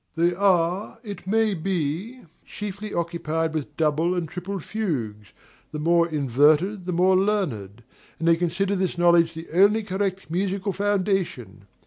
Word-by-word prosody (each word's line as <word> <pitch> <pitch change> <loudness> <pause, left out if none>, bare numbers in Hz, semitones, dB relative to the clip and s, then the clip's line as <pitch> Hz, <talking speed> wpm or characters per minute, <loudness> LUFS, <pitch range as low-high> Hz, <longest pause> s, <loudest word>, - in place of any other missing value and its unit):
They 170 +1 +2
are, 185 0 +1
it 200 -5 -8
may 220 +1 +2
be, 185 - -3 0.2
chiefly 205 0 -7
occupied 165 -1 -2
with 150 -1 -5
double 160 +3 +1
and 175 -2 -2
triple 185 +4 -5
fugues 130 - -4 0.4
(the - - -5
more 170 +2 +2
inverted 155 - +2
the - - -1
more 180 +2 +3
learned), 145 - -1 0.3
and 165 - -2
they 165 - +6
consider 180 +4 -1
this 185 -2 -1
knowledge 170 -1 +4
the 165 +1 -7
only 205 +5 +4
correct 195 -3 -3
musical 195 +2 -1
foundation. 185 - -1
175 Hz, 140 wpm, -24 LUFS, 160-195 Hz, 0.4 s, they